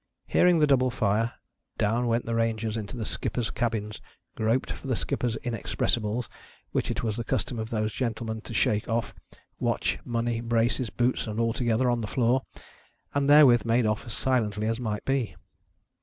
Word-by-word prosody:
Hearing 180 Hz, -1 st, +4 dB
the 155 Hz, -, +5 dB
double 130 Hz, -3 st, +3 dB
fire, 110 Hz, 0 st, +1 dB, 0.4 s
down 115 Hz, +4 st, +1 dB
went 115 Hz, +1 st, +1 dB
the 115 Hz, -, -2 dB
Rangers 115 Hz, -1 st, 0 dB
into 110 Hz, +2 st, -5 dB
the 110 Hz, -, -3 dB
skippers' 120 Hz, +2 st, -2 dB
cabins; 110 Hz, -3 st, -2 dB, 0.3 s
groped 115 Hz, +4 st, 0 dB
for -, -, -7 dB
the 130 Hz, -, +1 dB
skippers' 120 Hz, +1 st, -1 dB
inexpressibles, 115 Hz, -1 st, -1 dB, 0.4 s
which -, -, -1 dB
it 120 Hz, +2 st, -2 dB
was 110 Hz, -1 st, -1 dB
the 120 Hz, -, -2 dB
custom 115 Hz, +1 st, -2 dB
of 110 Hz, 0 st, -4 dB
those 110 Hz, -2 st, -1 dB
gentlemen 110 Hz, -3 st, -3 dB
to 115 Hz, -, -9 dB
shake 105 Hz, 0 st, +1 dB
off, 115 Hz, 0 st, -1 dB, 0.5 s
watch, -, -, 0 dB
money, 115 Hz, -1 st, -1 dB
braces, 115 Hz, +1 st, +1 dB
boots, 120 Hz, 0 st, 0 dB
and 110 Hz, +1 st, -3 dB
all 115 Hz, -1 st, +2 dB
together, 120 Hz, +1 st, +1 dB
on 120 Hz, -1 st, +1 dB
the 110 Hz, -, -3 dB
floor; 125 Hz, +2 st, +2 dB, 0.7 s
and 140 Hz, 0 st, +1 dB
therewith 145 Hz, -5 st, +7 dB
made 115 Hz, +1 st, +2 dB
off 110 Hz, 0 st, 0 dB
as 115 Hz, -, -5 dB
silently 110 Hz, -5 st, 0 dB
as 115 Hz, +2 st, 0 dB
might 110 Hz, -4 st, -3 dB
be. 135 Hz, -4 st, 0 dB
115 Hz, 175 wpm, -27 LUFS, 110-125 Hz, 0.7 s, therewith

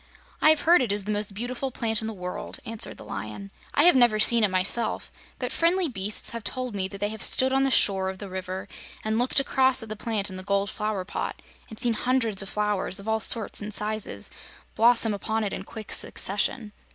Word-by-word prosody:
"I -, -, +6 dB
have 310 Hz, -2 st, +4 dB
heard 340 Hz, -1 st, +5 dB
it 240 Hz, -5 st, 0 dB
is 205 Hz, 0 st, 0 dB
the 210 Hz, -, -3 dB
most 205 Hz, -1 st, -1 dB
beautiful 245 Hz, +4 st, -3 dB
plant 225 Hz, -3 st, +1 dB
in 220 Hz, -, -4 dB
the 225 Hz, -, -4 dB
world," 180 Hz, -1 st, -6 dB
answered 225 Hz, -1 st, -1 dB
the -, -, -12 dB
Lion. 110 Hz, -, -7 dB, 0.2 s
"I 290 Hz, -, +5 dB
have 355 Hz, -3 st, +7 dB
never 240 Hz, -4 st, +5 dB
seen 230 Hz, +1 st, +4 dB
it -, -, +5 dB
myself, 190 Hz, +5 st, +1 dB, 0.3 s
but -, -, -3 dB
friendly 345 Hz, +2 st, +2 dB
beasts 210 Hz, -5 st, -2 dB
have 230 Hz, -1 st, -6 dB
told 255 Hz, -1 st, -4 dB
me 190 Hz, -2 st, -1 dB
that 200 Hz, +1 st, -10 dB
they 205 Hz, +1 st, -1 dB
have 220 Hz, -1 st, -7 dB
stood 260 Hz, 0 st, +3 dB
on 270 Hz, -, +3 dB
the 270 Hz, -, +2 dB
shore 195 Hz, -6 st, +3 dB
of 190 Hz, -, -6 dB
the 200 Hz, -, -8 dB
river 185 Hz, 0 st, -6 dB, 0.4 s
and 220 Hz, +1 st, 0 dB
looked 250 Hz, +3 st, +2 dB
across 265 Hz, -2 st, +2 dB
at 220 Hz, -, -10 dB
the 215 Hz, -, -4 dB
plant 210 Hz, -2 st, -1 dB
in 185 Hz, -, -7 dB
the 185 Hz, -, -6 dB
gold 200 Hz, +1 st, 0 dB
flower 210 Hz, -3 st, -3 dB
pot -, -, -4 dB, 0.3 s
and 220 Hz, -, -9 dB
seen 240 Hz, -1 st, +3 dB
hundreds 230 Hz, -4 st, 0 dB
of 195 Hz, -, -5 dB
flowers, 210 Hz, -1 st, -1 dB
of 200 Hz, -, -11 dB
all 220 Hz, 0 st, +1 dB
sorts 225 Hz, 0 st, +1 dB
and 210 Hz, 0 st, -5 dB
sizes, 210 Hz, -, -3 dB, 0.4 s
blossom 230 Hz, -1 st, +4 dB
upon 220 Hz, +2 st, -2 dB
it 200 Hz, -, -3 dB
in -, -, -4 dB
quick 220 Hz, -2 st, -9 dB
succession. 210 Hz, +3 st, 0 dB
215 Hz, 225 wpm, -26 LUFS, 200-240 Hz, 0.4 s, have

